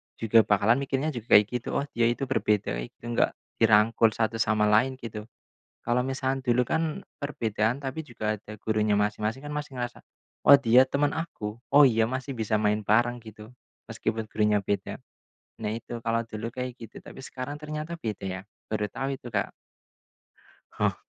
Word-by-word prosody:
juga 115 0 +4
bakalan 105 +5 +3
mikirnya 140 +2 -1
juga 120 -5 +2
kayak 105 0 +8
gitu, 125 -1 -4
"Oh - - +1
dia 115 0 +2
itu 120 +3 -1
berbeda, 105 -6 0 0.2
itu - - -34
enggak 120 0 +1 0.2
dirangkul 110 0 +4
satu 115 0 -1
sama 110 -1 +2
lain," 110 +5 +3
gitu. 110 -3 -8 0.6
Kalau 120 +1 +2
misal 135 +1 -1
dulu 125 -1 +2
kan, 160 +4 -2 0.2
perbedaan 120 -2 -1
tapi 135 +4 -3
juga 110 -7 -3
ada 105 0 -10
gurunya 105 -1 +1
masing-masing, 105 +5 -1
kan 145 - -5
masih 150 -2 -5
ngerasa, 120 -1 -4 0.5
"Oh 140 - +11
dia 130 0 +5
teman 145 +1 +1
aku. 115 -10 -5
Oh 145 0 +7
iya 115 -3 +3
masih 130 +2 -4
bisa 110 -3 0
main 105 0 +1
bareng," 120 +4 +2
gitu. 110 +1 -12 0.4
Meskipun 110 0 -2
gurunya 105 -1 +1
beda. 100 0 -2 0.7
Nah 105 - -1
itu, 115 +1 -6
kalau 115 0 +1
dulu 115 +1 -5
kayak 125 -1 -5
gitu, 115 -4 -11
tapi 130 - -11
sekarang 130 +3 -6
ternyata 155 +2 -5
beda 110 -8 -5
ya, 95 0 -4 0.3
baru 105 -1 -2
tahu 135 0 -3
itu 120 -2 -11
Kak. - - 0 1.3
Oh. - - +1
115 Hz, 170 wpm, -27 LUFS, 110-130 Hz, 1.3 s, Oh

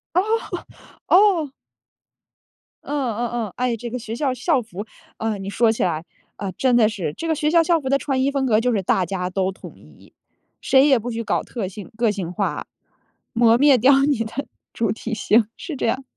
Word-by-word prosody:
哦， 360 - +5 0.9
哦。 365 -7 +4 1.3
嗯， 280 -5 -2
嗯 240 0 -1 0.2
嗯。 200 - -10
哎， 250 -1 0
这 235 +1 -6
个 250 +2 -4
学 225 -1 -6
校 265 0 0
校 260 +2 +1
服， 205 -2 -8 0.3
啊， 220 -1 -2
你 195 0 -6
说 225 +2 +3
起 220 - -1
来， 165 -2 -1 0.3
啊， 200 -2 -4
真 250 +6 +1
的 230 -3 +5
是。 180 -9 -4
这 330 - -4
个 320 - +1
学 300 0 0
校 335 +1 +5
校 335 0 +2
服 265 -3 -4
的 275 - +3
穿 270 -1 -1
衣 275 +2 +2
风 275 -1 0
格 220 -4 +3
就 245 +2 +1
是 210 -4 0
大 185 0 +1
家 180 0 -3
都 190 0 -1
统 190 - -12
一， - - -19 0.5
谁 270 +1 +4
也 270 -3 +5
不 240 +3 -5
许 230 0 -3
搞 - - -1
特 225 -6 -5
性 200 +4 -10
个 230 -2 +2
性 190 -4 -4
化， 180 - -2 0.7
磨 230 -1 +5
灭 280 0 +6
掉 260 +4 +5
你 280 -6 +1
的 235 +5 -5 0.3
主 225 -3 0
体 230 +1 -5
性， 215 0 +3
是 360 -6 -6
这 - - -2
样。 260 +4 -1
235 Hz, 225 characters per minute, -22 LUFS, 210-275 Hz, 1.3 s, 灭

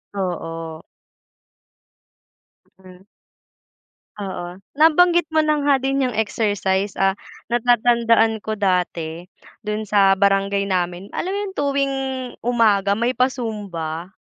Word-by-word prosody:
Oo. 165 -4 -4 2.0
Mm. 185 +1 -16 1.1
Oo. 180 -3 -6 0.2
Nabanggit 335 +2 +4
mo 315 -1 +2
na 300 -1 +1
nga 285 -1 +4
din 270 +1 -1
yung 225 - -7
exercise, 205 -3 0
ah, 195 0 +3 0.4
natatandaan 235 -2 +3
ko 215 0 -4
dati 180 -3 -1 0.3
do'n 210 +1 -3
sa 195 -2 +4
barangay 200 0 +2
namin 180 -1 -2
alam 365 - -3
mo 400 - -2
yung 385 - -8
tuwing 275 -1 0 0.5
umaga 210 -4 +2
may 240 +3 0
pa-Zumba. 205 - -3
205 Hz, 105 wpm, -21 LUFS, 185-250 Hz, 2.0 s, Nabanggit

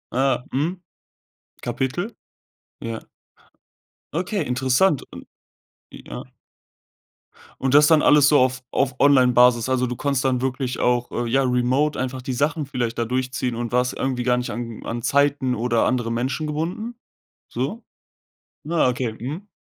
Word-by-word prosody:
Ah, 130 -2 +1
mhm. 165 +7 -1 0.8
Kapitel? 130 - -2 0.7
Ja. 115 -1 -5 1.1
Okay, 180 +2 -1
interessant 130 +6 +2
und - - -10 0.7
ja. - - -9 1.4
Und 135 0 0
das 150 0 +7
dann 160 -2 +5
alles 145 -1 +6
so 150 - +5
auf 130 0 +1
auf 130 -2 0
Online-Basis 125 -3 +5
also 125 -1 +1
du 125 - -4
konntest 140 0 -1
dann 130 -2 +1
wirklich 130 -1 -2
auch, 120 0 +1
äh, 120 0 -2
ja, 135 +2 +3
remote 130 +4 +1
einfach 130 0 -3
die 130 0 -4
Sachen 145 +3 0
vielleicht 120 -4 -3
da 115 - 0
durchziehen 125 0 -2
und 120 0 -4
warst 125 0 +1
irgendwie 130 -2 -2
gar 125 0 +2
nicht 125 - -3
an 115 -2 -6
an 120 +1 -4
Zeiten 140 -1 +2
oder 115 0 +1
andere 120 -2 0
Menschen 130 +6 -2
gebunden? 175 +10 -3 0.5
So? 140 - -3 0.8
Na, 160 -4 +2
okay. 120 -3 -2
Mhm. 150 - -6
130 Hz, 145 wpm, -22 LUFS, 125-145 Hz, 1.4 s, das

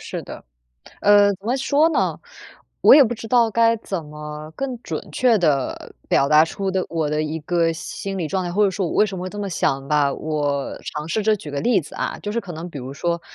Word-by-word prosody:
是 - - -6
的。 - - -10 0.6
呃， 205 0 +6
怎 195 +3 -19
么 245 +3 +1
说 285 +4 +3
呢？ - - 0 0.6
我 - - +9
也 290 - +8
不 240 - -1
知 225 -1 -8
道 235 -1 +4
该 230 +1 +4
怎 190 -6 -5
么 150 0 -8
更 260 -3 -4
准 - - -6
确 245 -4 +3
地 145 - -1
表 140 - +3
达 155 +1 +7
出 195 +3 -3
的 185 -1 -1
我 160 -3 -1
的 150 0 0
一 155 +1 -3
个 165 +1 +1
心 195 +4 -6
理 165 -4 -2
状 190 +1 -1
态， 175 - -3
或 205 +4 +2
者 195 - +3
说 190 -2 -2
我 - - -4
为 215 - +4
什 195 -2 -6
么 180 - -5
会 185 - -4
这 205 - -9
么 200 - -3
想 135 -4 -1
吧。 145 -2 +2
我 145 -3 -2
尝 150 0 -5
试 210 +6 -1
着 215 0 +3
举 155 -7 -9
个 140 0 -3
例 240 -2 +3
子 150 - -13
啊， - - -3
就 205 - -4
是 235 - -1
可 190 - -8
能 165 +3 -7
比 145 - -7
如 130 +1 -7
说， 170 +3 -2
180 Hz, 265 characters per minute, -21 LUFS, 150-210 Hz, 0.6 s, 我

